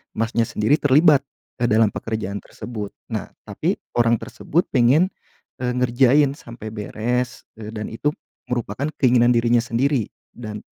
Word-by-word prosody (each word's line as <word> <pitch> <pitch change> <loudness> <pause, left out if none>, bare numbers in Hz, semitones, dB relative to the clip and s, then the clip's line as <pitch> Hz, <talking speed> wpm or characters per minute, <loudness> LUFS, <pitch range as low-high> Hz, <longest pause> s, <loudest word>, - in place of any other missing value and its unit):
Masnya 115 +1 0
sendiri 110 +9 +1
terlibat 145 +1 +5 0.4
ke 120 - +2
dalam 110 -2 +4
pekerjaan 110 -3 -4
tersebut. 105 -3 -8 0.2
Nah, - - -3 0.2
tapi - - -1 0.2
orang 120 -1 +3
tersebut 165 - -1
pengen, 140 +9 +4 0.5
eee, 125 -1 -1
ngerjain 130 +3 +4
sampai 115 -6 -9
beres, 120 +3 -2 0.2
eee, 110 +1 -7
dan 105 0 -5
itu 115 +6 -3 0.4
merupakan 120 +3 -2
keinginan 120 -2 +4
dirinya 120 0 +3
sendiri 120 0 0 0.2
dan, 105 -3 -8
120 Hz, 135 wpm, -22 LUFS, 110-130 Hz, 0.5 s, terlibat